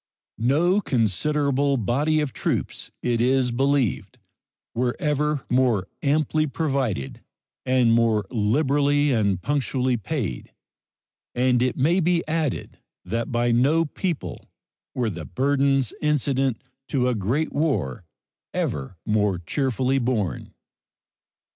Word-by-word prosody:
No 165 - +3
considerable 140 - +1
body 140 +8 +1
of 145 -4 -3
troops, - - -2
it 120 -2 +1
is 130 0 +2
believed, 135 -2 0 0.6
were 120 +1 0
ever 150 -3 0
more 120 -7 +1
amply 155 +1 +1
provided 135 - -2 0.5
and 125 -3 +4
more 115 -2 +2
liberally 145 +5 +2
and 100 -6 +1
punctually 130 0 0
paid, 110 - -4 0.8
and 125 0 +2
it 125 -1 0
may 165 +8 +3
be 175 -1 +1
added 155 -4 -2 0.3
that 115 +5 -3
by 120 0 +1
no 140 +8 +3
people 170 +1 -4 0.5
were 120 -3 0
the 85 -4 -7
burdens 135 - +1
incident 135 -4 0 0.2
to 125 -3 +1
a 125 - +2
great 120 +9 -1
war 105 - -1 0.5
ever 70 +5 -2
more 105 -3 +1
cheerfully 130 - 0
borne. 115 - -2
130 Hz, 110 wpm, -24 LUFS, 115-145 Hz, 0.8 s, and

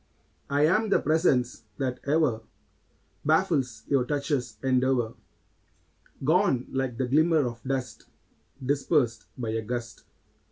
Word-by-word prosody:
I 145 +1 +3
am 215 +7 +2
the - - +4
presence 155 -6 +1 0.2
that 130 -2 -2
ever 140 -6 +2 0.8
Baffles 145 - +1
your 135 -3 +2
touch's 140 -4 -2
endeavor, 130 -3 +1 1.1
Gone 155 -4 +2
like 130 -3 -2
the 130 - 0
glimmer 155 +3 +3
of 120 -1 -7
dust 130 -3 -3 0.6
Dispersed 135 -5 +1
by 120 -3 -3
a 110 0 -1
gust. 120 0 -5
130 Hz, 115 wpm, -27 LUFS, 120-150 Hz, 1.1 s, the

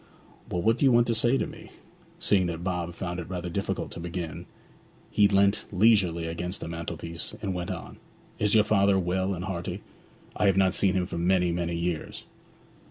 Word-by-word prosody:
'Well, 90 -1 -2
what 115 +4 +3
do - - +3
you 135 - +6
want 120 0 +5
to 120 - +1
say 120 +4 +3
to - - 0
me?' - - -11 0.5
Seeing 95 -3 +2
that 85 0 -4
Bob 90 -2 -2
found 90 0 -4
it 85 - -7
rather 90 -2 -4
difficult 100 +3 -3
to - - -7
begin, 85 -1 -5 0.6
he 105 - +5
leant 100 0 +3
leisurely 95 -5 +3
against 85 +3 -4
the - - -6
mantelpiece, 85 0 -5
and 100 -3 -2
went 90 -1 -4
on, - - -6 0.4
'Is 105 +1 +2
your 105 - +6
father 100 -2 +3
well 95 +1 0
and 90 +2 -5
hearty? 85 -3 -4 0.5
I 105 - +2
have 95 -1 +3
not 95 -1 +4
seen 95 -1 +2
him 90 -1 +1
for 85 - -5
many, 90 0 +2
many 85 0 -2
years.' 85 -1 -3
90 Hz, 195 wpm, -27 LUFS, 85-100 Hz, 0.6 s, you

